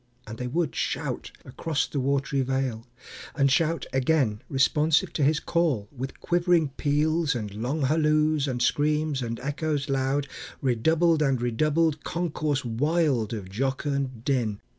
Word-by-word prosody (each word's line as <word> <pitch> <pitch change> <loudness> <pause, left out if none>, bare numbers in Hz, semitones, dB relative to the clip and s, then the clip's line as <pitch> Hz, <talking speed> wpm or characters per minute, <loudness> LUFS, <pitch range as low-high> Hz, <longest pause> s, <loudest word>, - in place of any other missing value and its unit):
And 110 +1 -8
they 125 - -3
would 155 +2 -1
shout - - -3 0.2
Across 150 +3 -2
the 145 - -2
watery 140 +1 0
vale, 130 -3 -2 0.5
and 140 -1 +3
shout 165 +3 +1
again, 130 -5 +1
Responsive 155 +6 +2
to - - -2
his 150 +2 +3
call, 150 -12 0
with 130 +1 -6
quivering 175 -3 +2
peals, 150 +2 +1
And 105 -4 -4
long 125 +8 -2
halloos, 155 0 +2
and 125 -2 -1
screams, 150 0 +1
and 115 -1 -4
echoes 145 +1 -2
loud 135 +1 0 0.3
Redoubled 160 +6 +2
and 135 -4 +2
redoubled; 150 +6 +1
concourse 155 -5 -2
wild 135 -1 +1
Of 105 -5 -5
jocund 135 +2 -2
din! 120 -7 0
140 Hz, 140 wpm, -26 LUFS, 130-155 Hz, 0.5 s, and